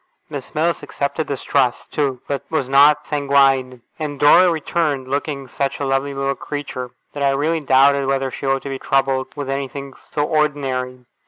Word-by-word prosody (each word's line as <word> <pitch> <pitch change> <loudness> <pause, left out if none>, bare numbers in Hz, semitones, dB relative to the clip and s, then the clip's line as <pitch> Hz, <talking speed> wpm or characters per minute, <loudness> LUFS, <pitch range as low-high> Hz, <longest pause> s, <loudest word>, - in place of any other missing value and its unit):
Miss 140 -1 -7
Mills 165 +1 +1
accepted 140 +3 -3
this 140 - -4
trust, 130 -4 0
too; 135 -4 -1
but 140 -2 -2
was 155 -5 -1
not 140 +2 +5
sanguine. 135 -4 +2 0.2
And 145 -3 -4
Dora 180 +5 +7
returned, 155 -4 -1
looking 140 0 -3
such 140 +1 -2
a 140 - -1
lovely 135 +1 -1
little 135 0 0
creature, 135 -3 -6 0.2
that 145 - -6
I 140 - +3
really 150 +4 +1
doubted 140 -1 +4
whether 135 -1 0
she 135 - -5
ought 135 0 +1
to 140 - -5
be 135 -1 -4
troubled 135 -1 +1
with 145 -2 -5
anything 135 0 -4
so 145 - -4
ordinary. 135 -5 -1
140 Hz, 175 wpm, -20 LUFS, 135-145 Hz, 0.2 s, Dora